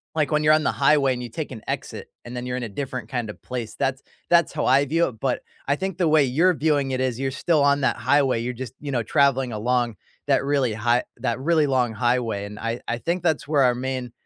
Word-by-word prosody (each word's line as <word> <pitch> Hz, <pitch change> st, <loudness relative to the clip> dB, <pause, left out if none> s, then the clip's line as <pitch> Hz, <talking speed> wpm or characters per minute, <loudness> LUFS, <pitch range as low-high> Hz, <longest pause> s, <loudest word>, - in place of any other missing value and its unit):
like, 155 Hz, -4 st, +1 dB
when 150 Hz, 0 st, +2 dB
you're 155 Hz, 0 st, +6 dB
on 155 Hz, -, +1 dB
the -, -, +2 dB
highway, 140 Hz, -1 st, +3 dB
and 125 Hz, -, -5 dB
you 120 Hz, -, -6 dB
take 145 Hz, +6 st, -5 dB
an 115 Hz, -4 st, -8 dB
exit, -, -, -5 dB, 0.2 s
and 120 Hz, +1 st, -8 dB
then 125 Hz, 0 st, -4 dB
you're 125 Hz, 0 st, -2 dB
in 125 Hz, -, -4 dB
a 115 Hz, -, -4 dB
different 130 Hz, +4 st, -5 dB
kind 120 Hz, -4 st, -3 dB
of 105 Hz, -, -9 dB
place, 120 Hz, -4 st, -5 dB
that's 135 Hz, 0 st, -1 dB, 0.3 s
that's 170 Hz, -1 st, +4 dB
how -, -, -2 dB
I 135 Hz, +2 st, +5 dB
view 165 Hz, +5 st, +1 dB
it, 110 Hz, -4 st, -14 dB
but 130 Hz, -2 st, 0 dB, 0.3 s
I 140 Hz, -, +2 dB
think 190 Hz, 0 st, -3 dB
the 175 Hz, -2 st, +2 dB
way 155 Hz, -1 st, +5 dB
you're 165 Hz, +8 st, +3 dB
viewing 145 Hz, -3 st, +1 dB
it 130 Hz, -, -1 dB
is 130 Hz, -2 st, -1 dB
you're 135 Hz, 0 st, -1 dB
still 155 Hz, +3 st, +1 dB
on 140 Hz, 0 st, +3 dB
that 135 Hz, -, +2 dB
highway, 130 Hz, -1 st, +2 dB
you're 125 Hz, +1 st, -3 dB
just, 125 Hz, -1 st, -7 dB
you 145 Hz, -1 st, -5 dB
know, 120 Hz, -3 st, 0 dB
traveling 135 Hz, +2 st, +2 dB
along 120 Hz, +1 st, 0 dB, 0.3 s
that -, -, +3 dB
really 140 Hz, -4 st, +1 dB
high 120 Hz, +3 st, +1 dB
that 120 Hz, -1 st, -2 dB
really 155 Hz, +1 st, +2 dB
long 125 Hz, -4 st, +1 dB
highway, 115 Hz, -3 st, 0 dB
and 105 Hz, +1 st, -9 dB
I 115 Hz, +1 st, -3 dB
I 115 Hz, -, -1 dB
think 170 Hz, +8 st, -2 dB
that's 160 Hz, -5 st, 0 dB
where 150 Hz, -2 st, +2 dB
our 125 Hz, -1 st, +3 dB
main 130 Hz, -1 st, -4 dB
130 Hz, 255 wpm, -23 LUFS, 120-145 Hz, 0.3 s, you're